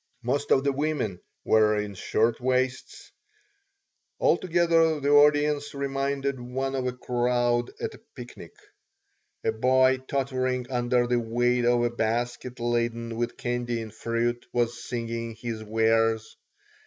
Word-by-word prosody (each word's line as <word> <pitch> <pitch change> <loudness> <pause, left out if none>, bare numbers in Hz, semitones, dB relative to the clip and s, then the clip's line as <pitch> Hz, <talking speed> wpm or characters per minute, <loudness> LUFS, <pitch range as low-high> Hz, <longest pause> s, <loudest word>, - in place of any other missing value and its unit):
Most 140 +4 -1
of 135 - +4
the 140 - +2
women 135 - -2 0.2
were 110 -1 +4
in 105 -1 -3
shirt 110 +4 0
waists. 130 +1 -1 1.1
Altogether 165 -3 +3
the 140 0 0
audience 145 0 +4
reminded 140 0 -2
one 130 +2 -3
of 130 -1 -1
a - - 0
crowd 120 -1 0
at - - -3
a - - -15
picnic. - - -10 0.9
A - - +2
boy 130 +3 +3
tottering 130 -2 -1
under 120 0 +1
the 120 0 +1
weight 120 +1 +1
of 120 0 +3
a 120 - +1
basket 120 +2 -2
laden 115 -1 -1
with 120 +1 -3
candy 120 -1 -2
and 110 -2 -7
fruit 120 +1 -1
was 120 0 -1
singing 115 -1 -4
his 115 -1 -5
wares. 115 0 +1
120 Hz, 130 wpm, -26 LUFS, 115-135 Hz, 1.1 s, of